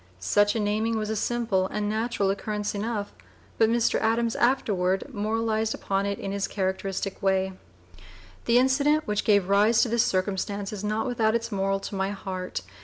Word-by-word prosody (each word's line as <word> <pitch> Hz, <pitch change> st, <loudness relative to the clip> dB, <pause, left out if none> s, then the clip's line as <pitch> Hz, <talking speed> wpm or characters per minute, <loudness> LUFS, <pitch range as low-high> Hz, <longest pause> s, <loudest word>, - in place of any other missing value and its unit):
Such 205 Hz, -, +2 dB
a -, -, 0 dB
naming 215 Hz, +2 st, 0 dB
was 215 Hz, 0 st, -2 dB
a -, -, -1 dB
simple 215 Hz, -4 st, 0 dB
and 210 Hz, +1 st, -2 dB
natural 215 Hz, -2 st, 0 dB
occurrence 210 Hz, +1 st, -3 dB
enough, 205 Hz, 0 st, -3 dB, 0.5 s
but 225 Hz, -1 st, +5 dB
Mr. 235 Hz, 0 st, +2 dB
Adams 230 Hz, +1 st, +1 dB
afterward 195 Hz, -7 st, +1 dB
moralized 220 Hz, +1 st, 0 dB
upon 195 Hz, 0 st, -1 dB
it 200 Hz, 0 st, -2 dB
in 195 Hz, -, -5 dB
his 200 Hz, 0 st, -1 dB
characteristic 190 Hz, 0 st, -3 dB
way: 190 Hz, 0 st, +1 dB, 0.9 s
"The 235 Hz, 0 st, +4 dB
incident 280 Hz, +4 st, +3 dB
which 210 Hz, -1 st, -1 dB
gave 200 Hz, -3 st, +3 dB
rise 210 Hz, +3 st, +4 dB
to 240 Hz, -, -1 dB
this 235 Hz, 0 st, +3 dB
circumstance 200 Hz, +1 st, -1 dB
is 205 Hz, -1 st, -6 dB
not 215 Hz, +1 st, -1 dB
without 230 Hz, -3 st, +1 dB
its 230 Hz, 0 st, -2 dB
moral 195 Hz, 0 st, 0 dB
to -, -, -7 dB
my 190 Hz, 0 st, -1 dB
heart. 185 Hz, -, -5 dB
210 Hz, 175 wpm, -26 LUFS, 195-225 Hz, 0.9 s, but